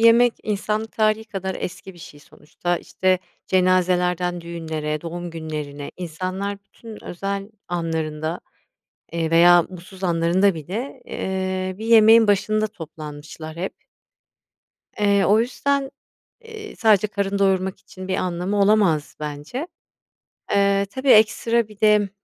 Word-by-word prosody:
yemek 230 +1 +6
insanlık 215 +1 -2
tarihî 215 0 +1
kadar 190 -4 -4
eski 185 +1 -7
bir - - -16
şey 145 -2 -12
sonuçta, 175 +4 -4
işte, 185 0 0 0.3
cenazelerden 180 -1 +2
düğünlere, 160 -3 -4
doğum 175 +1 -6
günlerine, 150 -3 -6
insanlar 185 +4 -4
bütün 225 +1 -12
özel 195 +3 -4 0.2
anlarında, 160 -2 -2 0.7
eee, 165 -1 -1
veya 175 +1 +7
mutsuz 185 +2 -10
anlarında 175 +3 +3
bile, 215 - -6
eee, 185 0 -3
bir 220 - -5
yemeğin 225 0 +7
başında 215 +1 +2
toplanmışlar 155 -4 -9
hep 185 +3 -3 1.3
eee, 200 -1 +3
o 210 +2 +5
yüzden, 270 +3 -1 0.5
eee, 445 -2 -10
sadece 215 -3 +4
karın 200 -1 -2
doyurmak 190 -1 +1
için 185 0 -10
bir 190 - 0
anlamı 185 +2 -1
olamaz 195 -7 +3
bence. 150 - -5 0.8
Eee, 200 0 +3
tabii, 265 +1 -2
ekstra 225 +1 +4
bir 210 -2 -16
de, 210 -2 +4
190 Hz, 120 wpm, -22 LUFS, 170-215 Hz, 1.3 s, veya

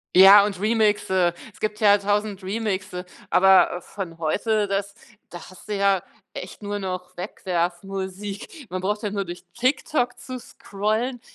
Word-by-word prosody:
Ja, 195 +2 +10
und 200 -3 -2
Remixe, 205 -5 +2 0.2
es - - -19
gibt 210 0 -2
ja 205 -2 +6
1.000 205 0 -1
Remixe, 190 -3 -3 0.2
aber, 190 -1 +5
äh, - - -9
von 175 -4 -7
heute 205 +6 0
das, 200 0 -2 0.3
da 175 - -8
hast 185 - -16
du 210 - -1
ja 195 -2 +3 0.3
echt 185 +3 -8
nur 205 0 -3
noch 185 -1 -5
Wegwerf 175 -1 -2
Musik. 195 - -6
Man 185 0 -3
braucht 210 +3 -1
ja 205 - -2
nur 200 -1 -1
durch 175 +1 -8
TikTok 250 0 0
zu 255 -2 -7
scrollen, 220 +5 -3
200 Hz, 160 wpm, -24 LUFS, 185-210 Hz, 0.3 s, Ja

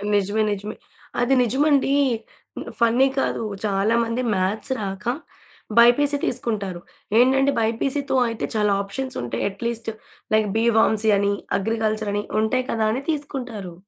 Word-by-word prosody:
నిజమే. 205 +2 +1
నిజమే. 205 +1 -4 0.5
అది 245 +2 +2
నిజండి. 275 +3 +2 0.7
మ్ - - -6
ఫన్నీ 235 +3 +4
కాదు. 230 - -1 0.2
చాలా 200 +2 +1
మంది 230 +2 -2
మ్యాథ్స్ 195 +6 -1
రాక 195 -1 -5 0.7
బైపీసీ 285 +5 +5
తీసుకుంటారు. 200 -7 -3 0.4
ఏంటంటే, 270 +2 +4
బైపీసీతో 265 +5 -1
అయితే 230 - -3
చాలా 210 -1 +2
ఆప్షన్స్ 260 +7 -5
ఉంటాయి. 120 - -3
అట్‌లీస్ట్, 230 +3 -4 0.5
లైక్ 215 -1 +2
బి 225 - +2
ఫార్మసీ 220 -1 +3
అని, 200 0 +1 0.3
అగ్రికల్చర్ 215 0 -1
అని, 205 0 -1 0.2
ఉంటాయి 255 +4 0
కదా! 220 -1 0
అని 250 +4 -2
తీసుకుంటారు. 255 - -4
225 Hz, 130 wpm, -23 LUFS, 205-255 Hz, 0.7 s, బైపీసీ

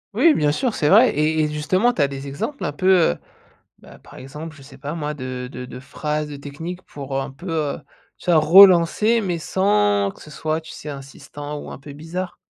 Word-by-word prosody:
Oui, 330 -2 +5
bien 150 -1 +2
sûr, 245 - -1
c'est 150 - +1
vrai, 225 +6 +7
et 155 +1 +1
et 150 - +1
justement, 185 +10 +1
tu 205 - -10
as - - +2
des 135 0 -7
exemples 220 - -5
un 145 - -1
peu, 185 - +3
heu, - - -12 0.6
bah, - - -16
par - - -16
exemple, 150 +4 -9
je 145 - -16
sais 135 -1 -14
pas 145 +2 -6
moi, 150 -2 -3
de 130 -3 -6
de 125 -1 -8
de 125 0 -9
phrases, 150 +3 -3
de 145 - -8
techniques 160 +6 -7
pour 140 -4 -8
heu, 135 - 0
un 135 0 -6
peu 175 +7 -9
heu, 155 -3 -1 0.4
tu - - -16
vois, 160 - +6
relancer, 190 +6 +6
mais 180 -4 -2
sans 105 - +1
que - - -18
ce - - -12
soit, 155 +1 -2
tu 160 - -12
sais, 150 - -8
insistant 145 +1 -8
ou - - -9
un - - -9
peu 140 +1 -11
bizarre? 170 +5 -6
150 Hz, 230 wpm, -21 LUFS, 140-175 Hz, 0.6 s, vrai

